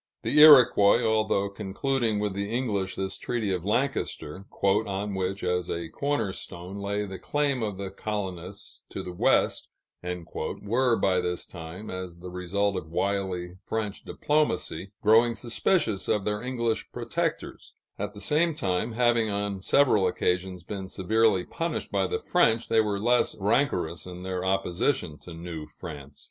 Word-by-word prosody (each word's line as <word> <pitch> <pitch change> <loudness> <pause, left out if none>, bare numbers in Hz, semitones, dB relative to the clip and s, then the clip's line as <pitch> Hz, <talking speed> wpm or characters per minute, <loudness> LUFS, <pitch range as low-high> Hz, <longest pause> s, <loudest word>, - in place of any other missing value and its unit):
The 150 - +2
Iroquois, 125 -7 +8
although 110 -3 +2
concluding 110 +4 -1
with 105 -1 -1
the 100 +1 -3
English 105 -6 -1
this 95 -1 -3
treaty 110 -5 -1
of 90 -2 -2
Lancaster, 105 - -2 0.2
"on 100 0 +1
which, 95 +1 -2
as 90 -1 0
a 85 -1 -3
corner 140 - -1
stone, 90 +3 -8
lay 100 +1 -2
the 95 -2 -7
claim 145 -3 0
of 105 -4 -2
the 95 -1 -5
colonists 100 -1 -5
to - - -5
the 90 - -6
West," 90 - +2 0.3
were 105 +7 -1
by 95 -3 +2
this 90 -1 -2
time, 85 +4 -8
as 95 -2 -6
the 90 +1 -9
result 95 +2 -1
of 80 -3 -6
wily 90 -1 -2
French 105 -2 -3
diplomacy, 125 - -1
growing 115 +2 +5
suspicious 115 - 0
of 105 -2 +1
their 105 0 -1
English 120 -2 -2
protectors; - - -3 0.2
at 105 - -4
the - - -8
same 150 - +1
time, 110 - -1
having 120 -1 +3
on 100 -1 -2
several 110 -4 +4
occasions 90 0 -1
been 95 0 -6
severely 105 0 +2
punished 165 0 -3
by - - +1
the 445 - -1
French, 170 - +2
they 110 -1 +5
were 105 -2 -1
less 120 +3 +2
rancorous 95 - 0
in 90 0 -8
their 95 -1 -3
opposition 95 - 0
to 90 - -11
New 80 -2 -7
France. 70 -3 -10
100 Hz, 155 wpm, -27 LUFS, 90-115 Hz, 0.3 s, Iroquois